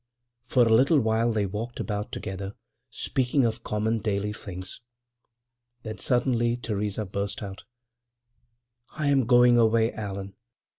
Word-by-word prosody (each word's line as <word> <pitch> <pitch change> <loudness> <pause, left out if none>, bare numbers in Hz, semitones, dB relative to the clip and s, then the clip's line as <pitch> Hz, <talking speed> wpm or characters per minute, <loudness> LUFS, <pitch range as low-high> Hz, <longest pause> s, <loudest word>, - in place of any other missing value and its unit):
For 125 0 +3
a 115 - +3
little 135 +7 +5 0.3
they 105 -2 0
walked 110 +5 -5
about 105 -1 -3
together, 95 +1 -5 0.3
speaking 130 0 0
of 115 +1 -2
common, 110 +2 0
daily 105 -1 -1
things. 95 -2 -7 1.0
Then 110 -2 -6
suddenly 120 -1 +2
Theresa 105 -2 -2
burst 100 +2 -4
out: 100 +1 -8 1.3
"I 150 -2 +1
am 135 -4 +3
going 120 -1 +6
away, 115 0 +3
Allan. 100 -2 -5
110 Hz, 120 wpm, -26 LUFS, 100-120 Hz, 1.3 s, going